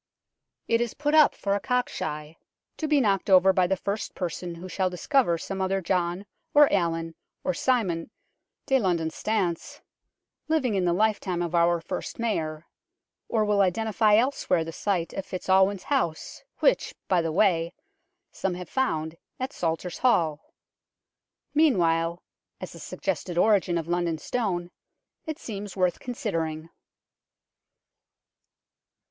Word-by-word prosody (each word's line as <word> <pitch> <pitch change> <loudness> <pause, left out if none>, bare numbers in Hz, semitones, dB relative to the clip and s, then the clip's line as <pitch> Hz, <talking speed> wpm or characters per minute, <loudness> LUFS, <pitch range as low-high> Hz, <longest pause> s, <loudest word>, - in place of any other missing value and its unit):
It 230 0 +2
is 240 -2 -2
put 295 +1 -1
up 310 -2 +6
for 200 - -1
a 200 - +1
cock 250 +4 0
shy, 150 +1 -5 0.4
to 315 - -2
be 300 -1 +4
knocked 200 -6 +1
over 190 0 +6
by 185 -1 +3
the 190 +1 0
first 200 +4 -4
person 175 -1 -4
who 175 +2 -8
shall 185 0 0
discover 180 - +1
some 195 +3 -5
other 190 +1 +1
John, 180 +1 -1 0.3
or 290 -1 +7
Alan, 165 -3 0 0.3
or 185 - 0
Simon 185 -6 0 0.3
" - - -58
de 270 0 +3
Londone 170 -6 0
Stane 195 -6 0 0.5
" - - -59
living 265 -8 +2
in 190 -2 +1
the 175 - +3
lifetime 195 -3 0
of 170 0 -4
our 170 0 +3
first 165 - -5
Mayor; 160 -9 -2 0.6
or 220 -2 +2
will 205 -1 +3
identify 215 +3 +3
elsewhere 220 -8 +2
the 165 - -6
site 175 -1 -2
of 195 - -3
FitzAlwin's 190 +1 +1
house 215 - -2 0.2
which, - - +2
by 180 -2 +3
the 165 -1 -2
way, 170 -2 +2 0.6
some 190 -2 -2
have 180 -1 -8
found 160 -11 -1 0.2
at 260 +3 -3
Salters 165 +1 -3
Hall. 165 -12 +1 1.0
Meanwhile, 170 - +2 0.4
as - - -7
a - - -11
suggested 175 -2 -4
origin 185 -3 +3
of 165 -1 -3
London 175 -1 0
Stone 180 -3 -2 0.6
it 310 -1 -3
seems 205 -3 -7
worth 180 -2 +1
considering. 165 -10 -3
185 Hz, 145 wpm, -26 LUFS, 170-220 Hz, 1.0 s, or